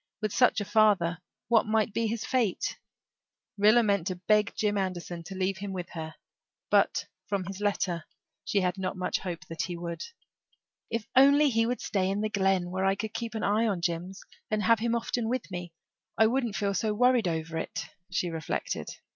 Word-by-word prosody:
With 215 -2 -2
such 250 - +4
a 205 - -3
father 195 -6 +3 0.3
what 225 -2 +4
might 220 0 +2
his 230 -1 -1
fate 235 -8 0 0.8
be? 205 - +5
Rilla 235 +2 +7
meant 200 -5 +1
to 185 - -1
beg 210 +4 +2
Jim 210 -1 +1
Anderson 180 -3 -3
to 195 - -7
leave 190 +1 -1
him 200 -1 -5
with 180 -2 -5
her, 160 -1 -6 0.6
but, - - +3 0.2
from 200 -2 -1
his 195 +2 -7
letter, 185 -5 0 0.4
she 200 - +1
had 180 +1 -1
not 185 0 -3
much 180 - -1
hope 170 -4 -5
that 165 0 -5
he 175 +1 -3
would. 170 0 -5 0.9
"If 230 -1 -2
he 260 - +9
would 280 - +5 0.3
only 245 +1 0
stay 190 -2 -1
in 200 +2 -1
the 215 - 0
Glen, 190 -3 +1
where 190 +1 -1
I 195 0 +3
could 215 +2 -5
keep 230 0 -4
an 220 - -2
eye 215 +3 +2
on 195 -5 -1
Jims 175 +2 -3 0.3
and 215 -1 0
have 230 -1 +4
him 235 +1 0
often 235 0 -1
with 255 -4 -2
me 180 -1 -5 0.5
I 220 - +6
wouldn't 235 -2 0
feel 200 -1 0
so 210 +2 0
worried 245 -2 +4
over 160 -1 -2
it," - - -4 0.2
she 180 -1 -1
reflected. 160 -2 -3
200 Hz, 195 wpm, -29 LUFS, 180-220 Hz, 0.9 s, he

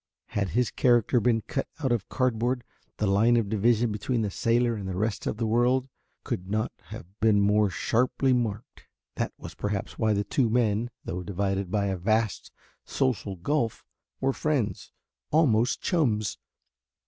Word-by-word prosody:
Had 100 -2 -1
his 125 -1 +2
character 120 0 +3
been 115 0 +2
cut 135 +5 -3
out 135 -5 -1
of 115 -5 -1
cardboard 125 0 0 0.3
the 105 - 0
line 110 +5 +4
of 110 -4 0
division 110 +2 +2
between 110 +3 -1
the 105 - -2
sailor 120 +2 +2
and 100 -4 -5
the 90 - -3
rest 110 +1 -1
of - - -2
the 115 - -1
world 125 +4 +2 0.3
could 90 +1 -4
not 110 +2 0
have - - -9
been 110 -2 +4
more 105 +1 +3
sharply 125 +7 +1
marked. 110 -4 -3 0.3
That - - -1
was 85 - -9
perhaps 100 +3 -4
why 110 -1 +3
the 100 0 0
two 115 +4 +1
men, 115 0 +1 0.2
though 90 +2 -3
divided 95 0 -2
by 100 +1 0
a 95 -1 -1
vast 110 +3 0 0.3
social 125 -7 -1
gulf, 115 - -1 0.3
were 135 0 +1
friends, 140 -9 -1 0.4
almost 125 -7 +3
chums. 115 - 0
110 Hz, 160 wpm, -27 LUFS, 100-120 Hz, 0.4 s, line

